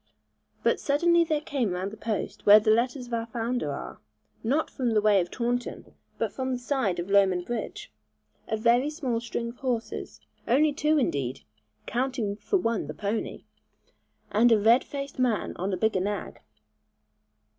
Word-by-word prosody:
But - - +2
suddenly 340 +4 +3
there 310 -3 0
came 260 -10 -1
round 185 +2 -3
the - - -8
post 220 -1 -4
where 205 +1 +10
the 215 0 +2
letters 245 +3 +1
of 240 - -10
our 230 0 -1
founder 230 - -2
are, 140 - -7 0.4
not 280 +8 0
from 245 -5 -1
the - - +6
way 205 -2 +4
of 175 - -4
Taunton 245 +2 -3 0.2
but - - -1
from 260 -1 -2
the 250 - 0
side 245 -7 -1
of 175 +3 -4
Lowman 190 -3 +4
bridge, 230 - -5 0.6
a 220 - -1
very 240 +5 +3
small 265 -7 -2
string 235 0 -4
of 240 - -11
horses, 245 -4 -3 0.3
only 295 +5 +4
two 305 +2 +2
indeed 135 - -1 0.4
(counting 245 -4 -1
for 225 - 0
one 230 - -1
the 155 - -6
pony), 205 +6 -3 0.9
and 230 +3 +4
a 225 - +6
red 230 +5 +5
faced 275 -1 -6
man 245 -5 0
on 190 +2 -2
the 190 - -1
bigger 220 -4 +1
nag. 205 +1 -3
230 Hz, 170 wpm, -27 LUFS, 205-260 Hz, 0.9 s, where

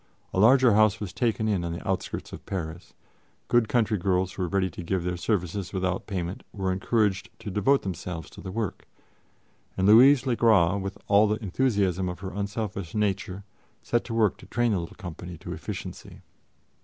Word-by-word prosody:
A - - 0
larger 125 +2 +6
house 110 0 +4
was 100 -4 -5
taken 115 -3 0 0.2
on 85 -1 -3
the 85 - -7
outskirts - - -3
of - - -8
Paris; 85 -2 -5 0.5
good 120 -2 +3
country 110 -4 +2
girls 95 0 +1
who - - -6
were 90 - 0
ready 95 +1 +1
to 90 - -8
give 90 +1 -1
their 90 0 -1
services 95 0 -2
without 95 -1 -1
payment 90 -2 -3
were 95 -2 -2
encouraged 100 0 0
to 105 - -7
devote 105 +9 +2
themselves 90 -3 -5
to - - -11
the 95 - -6
work, 110 -2 -4 0.9
and 95 - +1
Louise 130 +5 +7
le 125 -3 +1
Gras, 100 -6 +4
with 95 0 -4
all 105 +1 +5
the 105 +1 0
enthusiasm 95 -4 +1
of 90 -1 -7
her 95 -1 -6
unselfish 100 -3 -4
nature, 100 -1 -1 0.4
set 120 - 0
to 115 - -5
work 110 -4 +2
to - - -14
train 120 -1 +1
the 100 - +1
little 85 -1 -7
company 90 -3 -8
to 75 - -7
efficiency. - - -7
100 Hz, 185 wpm, -26 LUFS, 90-110 Hz, 0.9 s, Louise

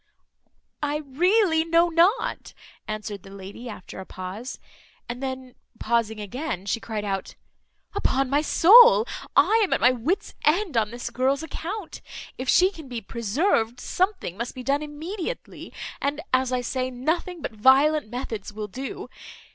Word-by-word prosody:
"I 300 +1 -1
really 345 +4 +3
know 335 +1 +3
not," 345 +7 +1 0.3
answered 215 -2 -5
the 195 - -14
lady, 200 +5 -9
after 190 -3 -9
a 190 - -7
pause; 195 +8 -7 0.5
and 240 +1 -6
then 260 -1 -5 0.2
pausing 225 -2 0
again, 210 - -4
she 205 - -1
cried 215 -2 -4
out 195 -1 -3 0.6
"Upon 270 -9 +1
my 285 +3 +2
soul, 460 +9 +7 0.3
I 450 +1 +5
am 390 - +1
at - - +2
my 245 - +6
wit's 315 - -2
end 340 - +2
on 220 -2 +2
this 240 +1 -6
girl's 265 +5 +1
account. 340 +5 -6 0.3
If 255 +1 -4
she 370 +1 +5
can 320 -7 -11
be 245 -2 -4
preserved, 235 - 0
something 370 - -1
must 235 +2 -4
be 255 - -7
done 280 +3 +1
immediately; 335 +10 -6 0.3
and, 285 +2 -1
as 255 0 +2
I 250 -1 0
say, 255 +1 -2
nothing 320 +8 -2
but - - -3
violent 265 +5 +4
methods 230 -4 -5
will 210 0 -5
do. 260 +7 -6
260 Hz, 155 wpm, -25 LUFS, 230-330 Hz, 0.6 s, soul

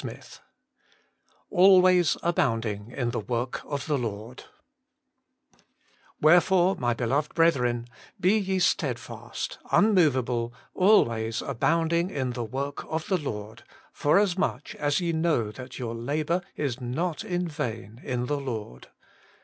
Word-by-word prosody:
XIII - - -6 1.3
Hlwa^0 185 -2 +6
abounbtno 115 -9 -1
in 120 -2 -2
the 115 - -2
TKHorft 120 +6 -4
ot 140 -1 -1
tbe 145 0 -1
Xort) 115 +2 -6 0.9
' - - -35
Wherefore, 180 +3 +5
my 120 -1 0
beloved 135 +6 -1
brethren, 125 -8 +2 0.3
be 190 +4 +3
ye 190 -1 -1
sted 180 - +1
fast, - - -7
unmoveable, 130 - +3 0.2
always 115 - +3
abounding 165 +6 +1
in 130 -8 -2
the 120 -2 -4
ivork 140 +4 -4
of 160 0 -3
the 190 - +3
Lord, 110 -6 -6 0.3
forasmuch 185 -3 +1
as 145 +2 0
ye 170 -2 -1
know 160 -10 +1
that 130 +3 -10
your 120 -3 -4
labour 150 +9 -1
is 135 -4 -3
not 155 - -2
in 180 -4 -2
vain 115 - -5
in 125 -1 -2
the 145 +3 -1
Lord.' 110 - -6
140 Hz, 125 wpm, -26 LUFS, 120-170 Hz, 1.3 s, Hlwa^0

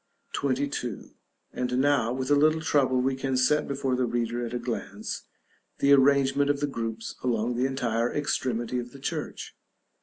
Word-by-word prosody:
§ 140 +1 0
XXII. 120 -8 -5 0.4
And 125 0 -1
now, 130 -4 +3
with 130 +2 -2
a - - +7
little 155 +2 +4
trouble, 135 -5 +2
we 130 +1 +1
can 135 0 -1
set 130 +4 +3
before 135 -2 -1
the 125 -1 +1
reader, 120 0 -1
at 115 - -4
a - - +1
glance, 120 -4 -5 0.5
the 140 0 +5
arrangement 140 0 +4
of 145 -1 +1
the 145 - +1
groups 115 -5 -4
along 120 -1 0
the 125 +2 +1
entire 120 -3 0
extremity 125 -4 -1
of 120 0 -7
the 140 - -11
church. - - -5
130 Hz, 175 wpm, -27 LUFS, 120-140 Hz, 0.5 s, a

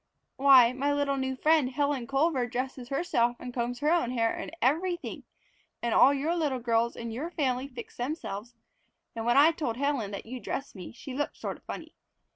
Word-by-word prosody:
"Why, 260 -3 +7
my 280 +3 0
little 285 -1 +1
new 265 -1 -2
friend 305 -1 +3
Helen 280 -2 -1
Culver 275 -2 +1
dresses 250 0 -4
herself 275 -6 +1
and 250 - -7
combs 245 +1 -3
her 300 +2 +2
own 335 -9 +2
hair 230 -2 +1
and - - -5
everything. 345 +6 -1 0.5
And 235 -1 -1
all 265 - +7
your 290 +5 0
little 300 -6 0
girls 235 -1 +1
in 230 -1 -5
your 275 +9 -4
family 265 -6 -1
fix 245 -4 -10
themselves, 245 -4 -4 0.6
and 225 0 -3
when 240 - +4
I 300 +4 +7
told 290 -9 -3
Helen 275 -6 0
that 200 - -6
you 250 +3 -6
dress 275 +5 -5
me 185 -4 -9
she 255 +3 -9
looked 290 +3 -3
sort - - -4
of - - -27
funny. - - -7
260 Hz, 195 wpm, -29 LUFS, 240-285 Hz, 0.6 s, Why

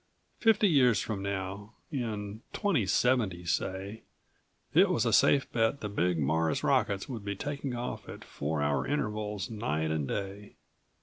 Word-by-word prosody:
Fifty 220 -2 +4
years 125 - +4
from 100 +2 -3
now, 100 +2 -4 0.2
in 110 -6 -4
2070, 115 - +1
say, 95 +5 -2 0.7
it - - +6
was - - +1
a - - +1
safe 140 -2 +5
bet 115 +4 +1
the 105 - -3
big 90 -3 +1
Mars 80 +2 +1
rockets 100 -1 +1
would 115 -6 -6
be 100 0 -3
taking 140 +2 -4
off 120 +1 -5
at - - -8
four 75 +1 -3
hour 70 -2 0
intervals 105 -5 -2
night 80 -8 -1
and 75 -3 -1
day. 100 +3 -5
105 Hz, 145 wpm, -30 LUFS, 95-120 Hz, 0.7 s, it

